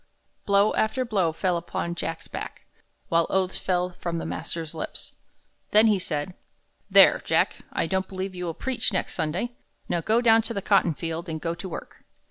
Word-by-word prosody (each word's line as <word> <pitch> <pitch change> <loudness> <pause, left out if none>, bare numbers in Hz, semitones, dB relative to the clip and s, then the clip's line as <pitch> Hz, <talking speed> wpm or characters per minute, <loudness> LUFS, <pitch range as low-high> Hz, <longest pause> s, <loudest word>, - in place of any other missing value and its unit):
Blow 200 +1 +4
after 255 +4 +1
blow 195 -8 +1
fell 180 +2 0
upon 170 0 -3
Jack's 165 -1 -4
back, - - -7 0.4
while 165 0 +3
oaths 190 -1 +1
fell 180 -1 0
from 170 -1 -4
the - - -4
master's 165 -1 -4
lips. 160 - -4 0.6
Then 215 +1 +6
he 210 -3 +4
said: 155 0 -3 0.6
"There, - - +7
Jack, - - +2
I - - 0
don't 190 0 -1
believe 190 0 -4
you 180 -1 -5
will 165 -2 -3
preach 250 +3 -1
next 185 - -1
Sunday. 175 +8 -1 0.4
Now 170 - 0
go 220 +6 +2
down 225 -2 +5
to 230 +1 -5
the 200 - -1
cottonfield 170 -3 +1
and 160 -1 -3
go 165 +1 -2
to 185 +2 -7
work." - - -8
180 Hz, 180 wpm, -26 LUFS, 165-205 Hz, 0.6 s, There